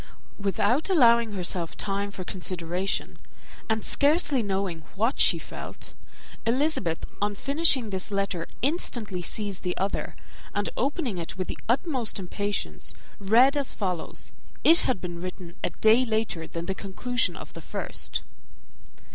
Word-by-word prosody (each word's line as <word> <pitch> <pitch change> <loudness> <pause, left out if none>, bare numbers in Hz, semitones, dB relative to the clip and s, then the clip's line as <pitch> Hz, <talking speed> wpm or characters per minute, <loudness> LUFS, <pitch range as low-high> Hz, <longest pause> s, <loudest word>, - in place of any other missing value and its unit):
Without 205 - +1
allowing 235 - +5
herself 180 -3 -2
time 200 0 -1
for 195 -2 -6
consideration, 180 0 -2 0.5
and 220 -1 0
scarcely 290 -2 +3
knowing 195 -5 -1
what 225 +6 +1
she - - +6
felt, - - -8 0.5
Elizabeth, 235 - +1 0.2
on 205 0 +1
finishing 275 -3 +2
this 190 -1 -3
letter, 195 -4 -1 0.2
instantly 235 - 0
seized 200 +1 -2
the 180 -1 -2
other, 195 +2 -2 0.4
and 205 0 0
opening 265 - -1
it 165 +2 -6
with 185 - -3
the - - -3
utmost 255 - +1
impatience, 200 +2 -3 0.2
read 235 +8 +6
as 285 -2 +1
follows: 180 -5 -3 0.3
it 330 +1 +8
had 245 -8 +1
been 175 -1 -5
written 180 -1 -6
a - - +2
day 220 +3 +5
later 220 -8 -1
than 170 0 -5
the 190 - -1
conclusion 245 +6 0
of - - -10
the - - -8
first. - - -2
205 Hz, 140 wpm, -27 LUFS, 185-250 Hz, 0.5 s, it